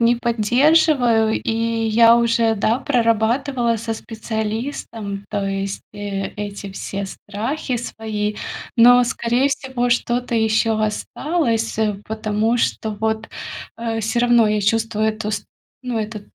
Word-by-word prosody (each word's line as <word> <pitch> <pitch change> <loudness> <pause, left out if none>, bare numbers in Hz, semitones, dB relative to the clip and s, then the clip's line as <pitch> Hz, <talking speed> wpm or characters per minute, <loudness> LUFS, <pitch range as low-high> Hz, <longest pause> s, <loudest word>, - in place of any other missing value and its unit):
не 235 +1 +4
поддерживаю. 240 0 +3
И - - -1 0.4
я 230 +1 +6
уже, 230 -1 +2
да, 220 +3 +1
прорабатывала 235 0 +1
со 225 +1 -3
специалистом, 220 -2 -4
то 205 -2 -2
есть, 195 0 -3
э, 205 -1 -4
эти 205 -1 -6
все 200 0 -4
страхи 230 +8 -4
свои. 215 -3 -3 0.4
Но, 245 +1 +7
скорее 245 +2 +1
всего, 265 -3 -2
что-то 240 0 0
ещё 220 0 +2
осталось, 225 +2 -1
э, 215 -2 +1
потому 220 +1 0
что 220 -1 -1
вот, 220 +1 -2 0.5
э, 230 -1 -2
всё 225 +2 0
равно 240 -2 +5
я 210 0 +1
чувствую 220 +1 +1
эту 215 -1 -3
ст 205 -1 -3 0.4
ну, 250 -3 -2
эту 215 0 -4
225 Hz, 130 wpm, -20 LUFS, 215-240 Hz, 0.5 s, Но